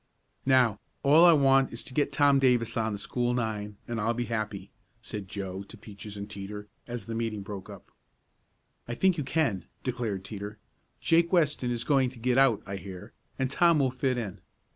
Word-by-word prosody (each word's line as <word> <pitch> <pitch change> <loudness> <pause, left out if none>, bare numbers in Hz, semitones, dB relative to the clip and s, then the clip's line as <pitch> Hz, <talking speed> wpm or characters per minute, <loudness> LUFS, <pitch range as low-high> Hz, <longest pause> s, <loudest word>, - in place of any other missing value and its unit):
"Now, 125 -6 +4 0.2
all 155 +5 +7
I 170 - +8
want 135 -2 +4
is 115 - -5
to - - -9
get 145 +2 +1
Tom 140 -1 +4
Davis 125 -4 +2
on 110 -1 0
the - - -3
school 120 +4 -1
nine, 105 -3 -3
and 115 -2 -2
I'll 115 +2 +1
be 120 +1 -1
happy," 110 -4 -4 0.3
said 105 -2 -6
Joe 95 -1 -5
to 100 +4 -12
Peaches 105 0 -10
and 100 0 -5
Teeter, 105 0 -7 0.2
as 120 -4 -5
the 115 - -5
meeting 115 -3 -2
broke 100 0 -7
up. 100 -3 -12 1.0
"I 120 - -3
think 185 +1 +2
you - - -1
can," 135 - 0 0.2
declared 115 -7 -3
Teeter. 105 0 -7 0.4
"Jake 170 +1 +3
Weston 150 -8 +2
is 120 -1 -1
going 135 -3 +3
to 125 - -14
get 125 +2 +2
out, 135 -6 +4
I 100 0 -5
hear, 95 -2 -9 0.2
and 130 - +1
Tom 170 +2 +4
will 135 -3 +2
fit 130 0 0
in. 105 -6 -5
115 Hz, 195 wpm, -28 LUFS, 105-135 Hz, 1.0 s, I